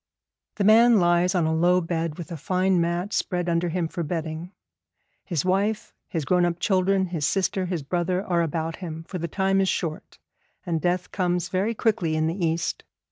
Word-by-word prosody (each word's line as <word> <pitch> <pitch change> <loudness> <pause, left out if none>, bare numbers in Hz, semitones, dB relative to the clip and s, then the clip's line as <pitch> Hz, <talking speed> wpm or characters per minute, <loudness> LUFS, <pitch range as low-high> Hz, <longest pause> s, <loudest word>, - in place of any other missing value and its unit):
The 205 - -1
man 225 +2 +6
lies 175 +1 +3
on 175 -3 +2
a 160 - +1
low 175 +3 +3
bed 165 -2 -2
with 175 -1 -8
a - - -3
fine 185 +3 +1
mat 175 +4 -1
spread 180 -1 -1
under 170 0 +1
him 170 0 -1
for 170 - -5
bedding. 165 +1 -4 0.7
His 170 -6 -2
wife, 200 +3 0
his 160 -4 -3
grown 180 +2 +3
up 175 -1 0
children, 190 0 +2
his 170 -4 -4
sister, 190 -1 0
his 175 -5 -3
brother 180 +5 -1
are 175 -3 +1
about 165 0 -2
him, 165 -3 -6
for 180 +2 -6
the 170 - -2
time 195 +3 +1
is 190 - +1
short, 160 -3 -3 0.5
and 165 -3 -1
death 180 +2 -1
comes 180 -2 -1
very 200 +5 0
quickly 190 -9 +1
in 155 0 +1
the 170 +3 -2
East. 165 0 -1
175 Hz, 190 wpm, -25 LUFS, 165-190 Hz, 0.7 s, man